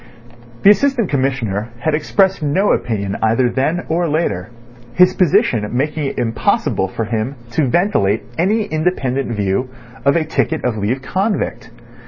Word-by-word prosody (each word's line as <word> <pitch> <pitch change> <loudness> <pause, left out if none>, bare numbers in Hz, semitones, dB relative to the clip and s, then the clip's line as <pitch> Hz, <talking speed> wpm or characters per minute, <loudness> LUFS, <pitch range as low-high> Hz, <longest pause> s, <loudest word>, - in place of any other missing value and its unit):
The 200 - +9
Assistant 255 -2 +1
Commissioner 125 -6 -1
had 155 +6 -1
expressed 190 +5 +1
no 165 +8 +2
opinion 100 -4 -1
either 115 +3 +2
then 155 +8 -1
or 170 +1 0
later, 110 - -1 0.5
his 180 +1 +5
position 120 - +2
making 150 +2 -1
it 135 - -4
impossible 115 -4 0
for 110 +4 -4
him 110 +5 -2 0.2
to 150 0 +1
ventilate 120 - +1
any 205 +6 +1
independent 140 - -1
view 100 +6 -1 0.3
of 140 +2 +3
a 165 -2 +1
ticket 160 -1 -1
of 125 -3 0
leave 110 +6 -2
convict. 195 - -2
140 Hz, 145 wpm, -18 LUFS, 115-175 Hz, 0.5 s, The